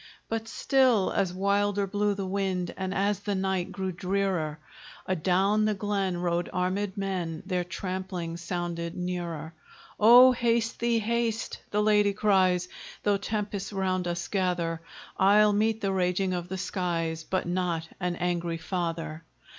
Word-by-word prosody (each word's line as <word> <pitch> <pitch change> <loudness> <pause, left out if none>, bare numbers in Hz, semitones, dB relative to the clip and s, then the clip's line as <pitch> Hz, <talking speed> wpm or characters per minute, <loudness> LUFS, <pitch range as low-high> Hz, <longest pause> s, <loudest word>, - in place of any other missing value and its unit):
But 225 0 -3
still 255 -5 +3
as 190 -3 +1
wilder 200 +2 +1
blew 205 +1 0
the 195 -1 -3
wind, 185 -2 -1
And 190 -1 -3
as 200 +1 +1
the 205 0 -2
night 190 -2 -1
grew 190 -1 -3
drearer, 185 -4 -1 0.5
Adown 190 +4 +2
the 215 -1 +1
glen 195 -2 -1
rode 175 0 -1
armèd 190 +2 -1
men, 180 -5 -3
Their 180 -2 -1
trampling 185 -2 -4
sounded 170 -1 -4
nearer. 170 -3 -4 0.5
"O 245 +4 +9
haste 235 -2 0
thee, 235 0 +2
haste!" 230 0 -1
the 210 0 +1
lady 210 -1 +4
cries, 185 -3 +3 0.4
"Though 205 -1 +3
tempests 205 -1 -3
round 185 -2 -1
us 175 0 -3
gather, 175 -4 -1 0.4
I'll 210 +2 +5
meet 220 +2 +1
the 195 - 0
raging 185 0 +1
of 175 0 -4
the 190 - -3
skies, 170 -3 -2
But 185 +3 -1
not 175 -2 -1
an 180 -1 -1
angry 175 -1 -1
father." 165 -2 -3
190 Hz, 145 wpm, -28 LUFS, 175-205 Hz, 0.5 s, O